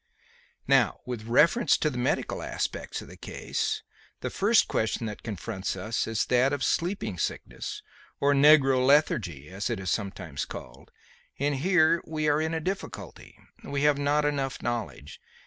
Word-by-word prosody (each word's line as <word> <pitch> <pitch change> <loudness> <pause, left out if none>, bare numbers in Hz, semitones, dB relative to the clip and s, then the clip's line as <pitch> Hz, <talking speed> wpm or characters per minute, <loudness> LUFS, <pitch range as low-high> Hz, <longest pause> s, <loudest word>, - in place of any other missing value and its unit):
Now, - - +3
with 120 -3 -5
reference 165 - +4
to 155 - 0
the 125 - -6
medical 125 - -1
aspects - - -4
of - - -13
the - - -12
case. - - -3 0.4
The - - -3
first 220 +3 +3
question 110 +1 -1
that 105 -2 -6
confronts 105 -2 -4
us 110 +1 -2
is 115 -1 0
that 125 +2 +3
of 140 -2 -2
sleeping 170 - -1
sickness, - - -4 0.4
or 145 0 +3
negro 135 -2 +6
lethargy 105 - +2
as 95 +5 -3
it 115 -4 -2
is 95 -1 -2
sometimes 95 -8 -3
called; - - -10 0.5
and 140 0 0
here 170 +1 +3
we 155 -1 -2
are 150 +1 +3
in 160 +1 -1
a - - 0
difficulty. 190 +5 -6 0.3
We 140 0 -2
have 150 -1 +4
not 145 +1 +2
enough 140 -2 -2
knowledge. 115 - -4
135 Hz, 160 wpm, -27 LUFS, 110-150 Hz, 0.5 s, negro